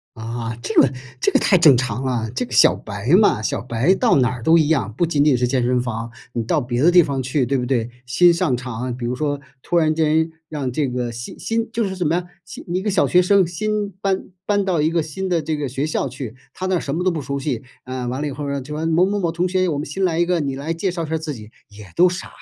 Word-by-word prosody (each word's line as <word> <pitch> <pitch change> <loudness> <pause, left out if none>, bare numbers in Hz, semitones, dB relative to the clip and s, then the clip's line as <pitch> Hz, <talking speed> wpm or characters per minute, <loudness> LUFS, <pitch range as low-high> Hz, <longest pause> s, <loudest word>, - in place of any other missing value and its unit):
啊， 115 0 -5
这 - - +1
个 135 -1 +4 0.3
这 - - +2
个 - - +4
太 190 - +4
正 155 -6 +7
常 125 0 -2
了， 120 -4 -1
这 125 - -1
个 125 - -17
小 125 - +5
白 100 +3 -6
嘛， 165 - +3
小 110 - -1
白 125 +10 +1
到 240 - +3
哪 125 -1 +3
儿 125 -2 -6
都 165 +4 +5
一 150 - +2
样， 130 -10 0
不 170 - +1
仅 150 -3 +2
仅 145 -3 +4
是 125 0 +1
健 125 0 +1
身 125 0 +1
房， 115 -1 -4 0.2
你 115 - -1
到 150 +7 +1
别 120 +1 -1
的 175 - +6
地 175 0 +7
方 140 -3 -1
去 130 0 0
对 135 +2 +1
不 125 - -2
对？ 120 -3 0 0.2
新 170 +8 +5
上 170 -6 +1
场， 125 0 -4
比 125 - -5
如 125 - -2
说 145 0 -2 0.2
突 175 - -2
然 155 -2 +3
间 160 0 +2 0.2
让 145 -5 -3
这 140 +2 0
个 125 -1 -3
新 120 +1 -8
新 225 0 -1
就 230 -1 0
是 190 -2 -3
什 180 - -2
么 155 - +2
呀， 175 +1 -1 0.2
新 175 - -10
一 185 - -1
个 210 - 0
小 190 - +2
学 180 0 +4
生 195 -1 +4
新 210 +3 -2
搬 195 -1 -1 0.2
搬 205 -1 +1
到 175 -5 +1
一 160 - +2
个 165 -1 +1
新 160 +5 -4
的 175 -3 +1
这 155 0 -2
个 145 -2 -2
学 135 +4 -2
校 150 - -1
去， 130 -2 -7 0.2
他 185 - -4
那 185 - +1
儿 - - +1
什 140 - -4
么 170 +4 -1
都 185 - +3
不 165 - -2
熟 140 0 -4
悉 135 -5 -3 0.2
啊， 130 0 -5
呃， 125 - -3
完 130 +3 -3
了 150 - -1
以 145 - -4
后 145 +2 -5
呢， 140 0 -2
就 150 +4 -7
完 160 +2 -2
了 165 - 0
某 175 +3 +4
某 205 +1 -1
某 170 -4 0
同 175 +2 -1
学， 185 0 +1
我 150 -4 -1
们 150 - -3
新 190 +7 -3
来 165 -2 0
一 175 - +2
个， 180 -1 +1
你 140 -2 -2
来 150 +5 -3
介 185 +3 -1
绍 170 -1 -4
一 - - -9
下 160 - 0
儿 - - +1
自 160 -1 -5
己， 110 -4 -10 0.2
也 105 -2 -13
都 180 +2 +6
傻， 180 +1 -4
145 Hz, 320 characters per minute, -21 LUFS, 125-175 Hz, 0.3 s, 正